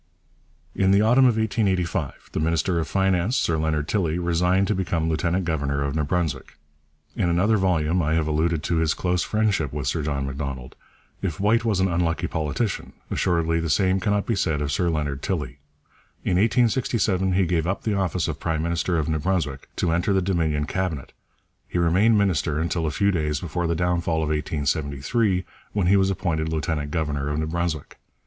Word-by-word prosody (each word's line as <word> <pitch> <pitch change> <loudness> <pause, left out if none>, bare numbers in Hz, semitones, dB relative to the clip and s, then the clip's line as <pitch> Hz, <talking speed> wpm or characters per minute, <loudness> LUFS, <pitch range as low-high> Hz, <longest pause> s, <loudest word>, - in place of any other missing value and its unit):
In 95 - +2
the 100 +2 +5
autumn 125 +4 +5
of 120 -3 +3
1885 95 - -1
the - - -2
minister 85 +2 +1
of 80 - -2
Finance, 95 +4 +1
Sir 85 - +1
Leonard 75 -1 0
Tilley, 85 -5 0
resigned 90 +2 +1
to - - +3
become 85 -4 -1
lieutenant 85 +3 0
governor 70 -4 -1
of 70 -1 -2
New 80 - +1
Brunswick. 75 -3 -2 0.6
In 85 - +1
another 95 +6 +3
volume 90 -2 +1
I 80 0 +1
have 80 -1 +1
alluded 80 +1 0
to 85 - 0
his 80 -1 +1
close 90 -1 0
friendship 105 -9 0
with 70 -2 -4
Sir 80 +5 0
John 70 -2 -2
Macdonald. 70 -2 -5 0.5
If 85 -6 -3
White 110 +4 +3
was 110 -5 +1
an 95 - +3
unlucky 85 -2 0
politician, 80 - -2 0.2
assuredly 85 -2 +1
the 80 0 -2
same 95 +5 +2
cannot 105 0 0
be 115 - 0
said 80 -6 0
of 75 -1 -2
Sir 85 +4 +1
Leonard 75 -4 -2
Tilley. 75 -8 -3 0.6
In 90 - +1
1867 110 -4 +2
he 95 0 +3
gave 85 -1 0
up 95 +1 -2
the 110 - 0
office 95 -4 0
of 75 -3 -4
prime 80 -2 -1
minister 85 +1 0
of 75 - 0
New 80 -1 0
Brunswick 75 -5 -2
to 85 - 0
enter 85 +4 +1
the 95 - +2
Dominion 80 -5 0
Cabinet; 85 -5 -3 0.5
he - - -3
remained 95 +7 +4
minister 90 -7 +1
until 85 0 -1
a - - +1
few 100 +6 +1
days 75 -4 -1
before 85 +1 -2
the 85 - 0
downfall 85 -2 0
of 75 - -1
1873, 75 - 0 0.3
when 100 -3 +1
he 95 +3 +4
was 95 -1 +3
appointed 85 -4 -1
lieutenant 75 -1 -2
governor 75 -3 -2
of 75 - -2
New 80 - 0
Brunswick. 85 -1 -3
85 Hz, 190 wpm, -24 LUFS, 75-95 Hz, 0.6 s, the